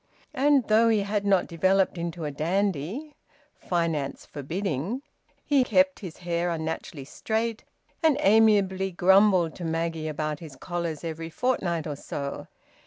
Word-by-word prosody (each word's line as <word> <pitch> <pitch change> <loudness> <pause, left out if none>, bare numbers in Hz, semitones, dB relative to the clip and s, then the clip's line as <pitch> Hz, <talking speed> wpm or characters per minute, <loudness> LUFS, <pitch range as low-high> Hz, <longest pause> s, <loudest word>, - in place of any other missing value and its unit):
And 275 -1 +3
though 225 +2 +5
he 220 -2 +3
had 205 0 -1
not 195 -2 +3
developed 190 +3 +2
into 170 -1 -4
a 150 - -3
dandy 190 - -2 0.5
(finance 165 -5 -2
forbidding), 175 - -3 0.4
he 280 -3 +4
kept 280 +2 +2
his 180 -6 -8
hair 175 0 -1
unnaturally 160 -3 -4
straight, 220 - -2 0.4
and 315 -4 +4
amiably 200 -3 +4
grumbled 185 -1 +4
to 180 - -7
Maggie 165 -1 -2
about 155 -1 -3
his 155 -5 -10
collars 170 -1 -4
every 165 0 -5
fortnight 175 -6 -1
or 150 -2 -4
so. 140 0 -6
175 Hz, 135 wpm, -26 LUFS, 160-210 Hz, 0.5 s, though